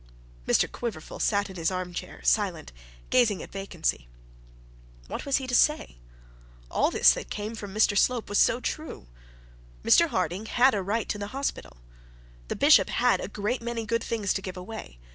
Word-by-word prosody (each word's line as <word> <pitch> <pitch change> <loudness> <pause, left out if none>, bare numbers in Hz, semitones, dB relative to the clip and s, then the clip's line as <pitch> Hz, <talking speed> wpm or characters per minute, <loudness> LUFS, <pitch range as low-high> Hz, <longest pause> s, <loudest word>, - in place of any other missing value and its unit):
Mr - - +4
Quiverful 225 -10 -6
sat 205 -1 +1
in 190 -2 -10
his 165 -1 0
arm 185 -1 -4
chair 170 - -7
silent, - - +1 0.4
gazing 230 -6 +3
at - - -12
vacancy. 175 - -3 1.0
What - - -6
was 275 - +3
he 265 - -4
to 250 - -5
say? 300 - +2 0.7
All - - +2
this - - +5
that - - -7
came 210 +1 -4
from 205 -3 -7
Mr 210 0 +2
Slope 240 +3 +2
was 205 - +1
so 240 - +4
true. 310 - -5 0.8
Mr 335 - +5
Harding 185 - -2
had 255 +3 +4
a 200 - 0
right 210 +4 -2
to 205 - -3
the 205 - -4
hospital. 275 - -4 0.7
The - - -3
bishop - - +5
had - - +2
a - - -4
great 215 +5 -3
many 230 -1 -4
good 230 +1 -1
things 210 -4 -1
to 195 - -3
give 185 -1 -7
away. 180 - -8
205 Hz, 180 wpm, -27 LUFS, 185-235 Hz, 1.0 s, this